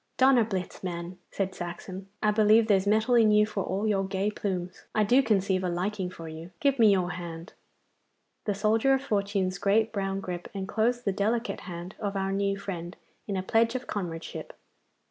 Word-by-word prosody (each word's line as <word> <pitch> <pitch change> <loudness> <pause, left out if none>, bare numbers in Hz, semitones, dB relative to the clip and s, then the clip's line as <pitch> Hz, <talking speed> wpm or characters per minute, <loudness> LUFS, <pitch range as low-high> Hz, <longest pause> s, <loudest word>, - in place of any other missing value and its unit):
'Donnerblitz, 230 -10 +2
man!' 175 0 -5
said 190 -1 -2
Saxon. 185 +2 -7 0.2
'I 210 - +4
believe 215 +1 +5
there's 200 -2 +3
mettle 220 +4 +3
in 230 -2 +6
you 210 0 +5
for 210 -2 -3
all 195 +5 -1
your 200 -2 +2
gay 195 +2 -1
plumes. 185 -4 -4
I 215 - +4
do 245 +6 +5
conceive 195 -5 +1
a 180 - 0
liking 185 +2 -2
for 165 -2 -9
you. 160 +2 -8
Give 275 -2 +2
me 220 -3 +7
your 180 -3 +1
hand!' 170 0 -7 0.9
The 205 - 0
soldier 220 +6 +3
of 265 - -3
fortune's 200 -5 0
great 215 +3 +2
brown 195 -1 -1
grip 180 -2 -5
enclosed 225 +5 0
the 200 - +1
delicate 225 +4 0
hand 175 +2 -7
of 205 -2 -3
our 195 0 -1
new 200 0 0
friend 180 -3 -6 0.3
in 200 -2 -2
a 185 - -2
pledge 230 +4 +2
of 255 - -3
comradeship. 170 -5 -5
200 Hz, 185 wpm, -28 LUFS, 185-215 Hz, 0.9 s, me